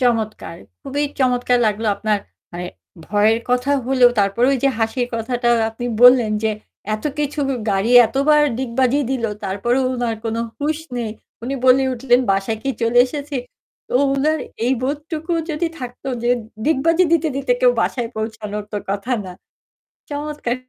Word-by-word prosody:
চমৎকার। 220 -8 -1 0.3
খুবই 285 +2 -2 0.2
চমৎকার 250 -1 +2
লাগলো 215 +1 -1
আপনার 215 -1 0 0.3
মানে 175 +1 -5 0.4
ভয়ের 215 +2 +3
কথা 250 +3 +1 0.2
হলেও 255 -2 +5
তারপরে 200 +5 +2
ওই 270 - +1
যে - - +5
হাসির 240 +2 0
কথাটা 240 +1 -1 0.2
আপনি 235 +2 -7 0.2
বললেন 245 -3 +7
যে 220 - +3 0.4
এত 215 - -7
কিছু 295 0 -2 0.3
গাড়ি 195 +4 +1 0.2
এতবার 295 +5 +3 0.2
ডিগবাজি 260 +2 +1
দিলো 235 -4 -1
তারপরেও 240 +7 0
উনার 240 -2 -2
কোনো 225 +1 -2 0.2
হুঁশ 305 +2 0 0.2
নেই। 225 -2 -3 0.3
উনি 265 +3 -3
বলে 260 +1 +6
উঠলেন, 245 0 +3
"বাসায় 195 +3 0
কি 270 - -1
চলে 230 +1 +3
এসেছি?" 285 +1 -5 0.5
তো - - -5 0.2
উনার 305 +3 +1 0.3
এই 255 - +3
বোধটুকু 305 +4 -3 0.2
যদি 315 +3 -1
থাকত 245 -2 -8 0.2
যে 240 - +1 0.3
ডিগবাজি 325 +4 +3
দিতে, 325 -1 +3
দিতে 280 - +1
কেউ - - +6
বাসায় 240 -3 -1
পৌঁছানোর 215 -1 -4
তো 210 - -2
কথা 205 +6 -2
না। 180 - -7 0.8
চমৎকার 290 -4 -3
245 Hz, 150 wpm, -20 LUFS, 225-275 Hz, 0.8 s, বললেন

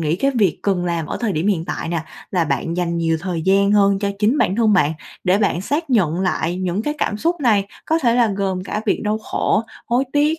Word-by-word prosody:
nghĩ 160 +1 0
cái 275 +7 +1
việc 215 -9 +1
cần 190 -3 0
làm 170 -3 -2
ở - - -4
thời 225 -4 0
điểm 160 +2 -1
hiện 185 -6 +1
tại - - -4
nè, 170 -1 -2 0.3
là 180 -3 +1
bạn 165 +2 -2
dành 170 -1 -1
nhiều 165 -1 +1
thời 175 -2 -3
gian 200 +2 +3
hơn 200 -1 +4
cho 200 0 -1
chính 220 +7 +2
bản 190 -3 +1
thân 220 -3 +3
bạn 160 -5 +3 0.3
để 185 +2 +3
bạn 200 -4 +1
xác 290 - -2
nhận 180 -8 +2
lại 180 -2 -1
những 185 +2 -2
cái 295 +5 -2
cảm 210 - -1
xúc 335 +7 -1
này 210 -7 +3 0.2
có 320 +1 +1
thể 235 -6 +2
là 240 -1 +4
gồm 190 -2 -1
cả 210 - -3
việc - - +1
đau 210 +1 0
khổ, 215 0 0 0.2
hối 245 +3 +1
tiếc 300 +2 +2
200 Hz, 250 wpm, -20 LUFS, 175-230 Hz, 0.3 s, hơn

